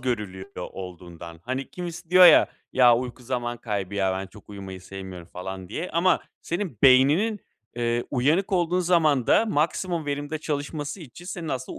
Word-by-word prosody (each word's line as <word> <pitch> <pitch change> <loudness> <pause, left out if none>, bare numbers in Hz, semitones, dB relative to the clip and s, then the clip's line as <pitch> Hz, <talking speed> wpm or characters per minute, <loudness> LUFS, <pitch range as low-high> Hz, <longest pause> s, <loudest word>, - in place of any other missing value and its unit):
görülüyor 105 -7 -3
olduğundan. 85 -2 -8
Hani, 130 +2 -4
kimisi 175 -1 -7
diyor 185 0 +9
ya, 165 - +7 0.2
"Ya, 120 -2 +6
uyku 125 0 -5
zaman 120 -1 -3
kaybı 100 -4 -4
ya. 95 -2 +1
Ben, 95 +1 -4
çok 105 +1 -17
uyumayı 95 -2 -8
sevmiyorum." 95 -2 -9
falan 95 0 -7
diye. 180 - -4
Ama 175 +2 +2 0.2
senin 170 - -4
beyninin, 145 - +5 0.4
eee, 120 0 0
uyanık 150 +10 +1
olduğun 180 0 +2
zamanda 165 - +3
maksimum 170 -1 -1
verimde 145 +2 -3
çalışması 145 +3 -4
için 165 +3 -12
senin 175 -3 -6
aslında 130 -3 -4
130 Hz, 155 wpm, -25 LUFS, -, 0.4 s, diyor